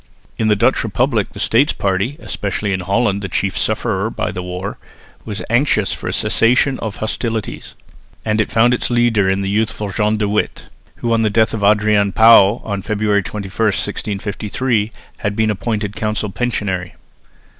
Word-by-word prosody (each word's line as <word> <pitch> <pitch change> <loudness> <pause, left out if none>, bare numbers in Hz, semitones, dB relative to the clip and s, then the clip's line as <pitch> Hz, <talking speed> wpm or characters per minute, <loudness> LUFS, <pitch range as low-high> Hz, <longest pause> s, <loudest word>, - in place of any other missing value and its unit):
In 110 - +1
the 105 - +4
Dutch 100 - +2
republic - - 0
the - - -9
States - - +3
party, 100 +8 -1
especially 100 -4 -3
in 95 - -1
Holland 100 +2 0
the 95 - -4
chief 95 +1 -1
sufferer - - 0
by - - -3
the 90 - -5
war, 90 +3 -5 0.5
was 105 -2 -5
anxious 115 -4 +2
for - - -6
a - - -1
cessation 125 +3 +2
of 110 -2 -4
hostilities; 110 0 -4 0.5
and 110 0 +2
it - - -3
found 120 +2 +4
its 125 - 0
leader 120 -5 +2
in 95 +1 +1
the - - -2
youthful 105 -1 -1
John 105 +2 +1
de 105 -1 0
Witt, 105 +1 -2 0.3
who 115 -1 -1
on 115 - +2
the 110 - +2
death 110 +1 +2
of 110 -2 -3
Adrian 105 -1 +3
Pauw 110 -1 +6
on 100 -2 -3
February 105 0 +1
21, 100 0 -6
1653, 105 +2 -1 0.3
had 105 0 -2
been 110 0 +2
appointed 105 0 -3
council 105 -1 -2
pensionary. 100 -7 -2
105 Hz, 170 wpm, -18 LUFS, 100-110 Hz, 0.5 s, Pauw